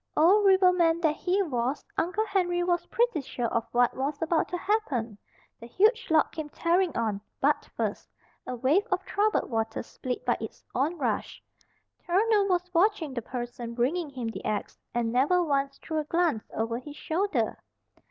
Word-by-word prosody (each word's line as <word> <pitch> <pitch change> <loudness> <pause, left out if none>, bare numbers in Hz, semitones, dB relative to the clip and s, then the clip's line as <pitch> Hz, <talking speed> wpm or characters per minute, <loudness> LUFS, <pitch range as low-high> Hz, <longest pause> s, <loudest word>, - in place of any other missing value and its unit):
Old 395 +6 +5
riverman 360 -3 +4
that 310 -2 +2
he 380 +2 +1
was, 260 -3 -2
Uncle 365 +6 0
Henry 355 -4 +1
was 350 -1 0
pretty 475 -9 +1
sure 250 -2 -4
of 230 0 0
what 245 0 +3
was 280 +2 -2
about 325 0 +1
to 355 - -3
happen. 290 - -1 0.4
The 235 - -10
huge 435 - +2
log 315 -1 +3
came 310 -2 -6
tearing 345 +1 +1
on, 215 -3 -1 0.2
butt - - +1
first, - - -2 0.4
a 250 - -3
wave 295 - +2
of - - 0
troubled 420 +1 +1
water 225 -1 -1
split 250 +1 -5
by 240 - +2
its 220 - -7
on 295 +7 0
rush. 295 - -2 0.6
Turner 415 +4 +3
was 360 -1 0
watching 340 -5 +2
the 240 - -3
person 240 0 -6
bringing 295 +7 0
him 250 -4 -4
the 225 - -7
axe, 210 -1 -2 0.2
and 235 -1 -1
never 295 +8 +3
once 275 -3 0
threw 315 -1 -3
a - - -1
glance 325 -7 0
over 230 +1 -2
his 290 +3 -10
shoulder. 375 +7 -1
315 Hz, 170 wpm, -28 LUFS, 245-360 Hz, 0.6 s, Old